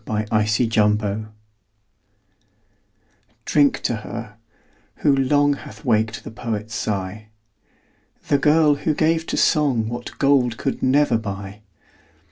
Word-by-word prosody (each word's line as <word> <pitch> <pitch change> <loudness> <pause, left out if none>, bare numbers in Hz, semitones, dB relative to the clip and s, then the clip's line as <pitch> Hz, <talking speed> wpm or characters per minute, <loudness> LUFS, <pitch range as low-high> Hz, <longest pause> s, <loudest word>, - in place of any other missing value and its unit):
DRINK 105 0 -2
TO 110 +1 +2
HER. 105 0 0 2.1
Drink 145 -2 +2
to 120 - -1
her, 110 0 -8 0.6
who 140 - +2
long, 145 +2 +2
Hath 140 - -11
waked 110 -2 0
the - - -8
poet's 110 -1 -5
sigh. 105 0 -4 1.0
The 140 - +2
girl, 150 +1 +4
who 150 +1 -1
gave 160 +1 +1
to - - -2
song 130 -8 +2
What 120 +1 -7
gold 130 -5 +2
could 135 - -3
never 130 -3 +3
buy. 100 -1 -7
115 Hz, 115 wpm, -21 LUFS, 105-140 Hz, 2.1 s, girl